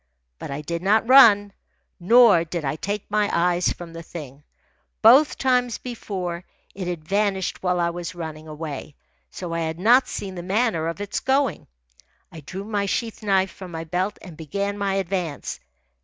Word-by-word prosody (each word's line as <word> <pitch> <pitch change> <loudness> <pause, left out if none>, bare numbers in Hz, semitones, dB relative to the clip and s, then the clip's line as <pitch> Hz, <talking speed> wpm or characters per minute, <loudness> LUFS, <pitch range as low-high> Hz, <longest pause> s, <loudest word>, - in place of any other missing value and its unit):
But - - -7
I 140 +2 -4
did 170 +2 -4
not 210 +4 +2
run. 210 -6 +7 0.5
Nor 225 -2 +6
did 170 -2 -5
I 135 - -1
take 200 +5 -4
my 210 -1 +2
eyes 175 +1 +2
from 170 -1 -8
the 165 - -7
thing. 150 -4 -10 0.6
Both 265 +7 +6
times 250 -3 +1
before, 185 -8 -5 0.3
it 185 -2 -5
had 165 -3 -5
vanished 200 -1 0
while 180 -1 0
I 170 0 +1
was 175 +1 -6
running 160 -2 -7
away, 150 -2 -7 0.3
so 175 -2 -6
I 165 - -1
had 160 0 -3
not 240 +8 +4
seen 195 -1 -5
the 175 - -6
manner 190 -3 0
of 165 +4 -4
its 205 - -3
going. 270 -1 0 0.6
I 165 - -10
drew 180 +6 -7
my 205 -1 -2
sheath 225 +3 -3
knife 195 -3 +1
from 185 0 -10
my 165 -1 -5
belt 180 +5 -2
and 180 -5 -10
began 200 +6 -3
my 200 -1 -1
advance. 180 -5 -3
185 Hz, 175 wpm, -23 LUFS, 165-205 Hz, 0.6 s, run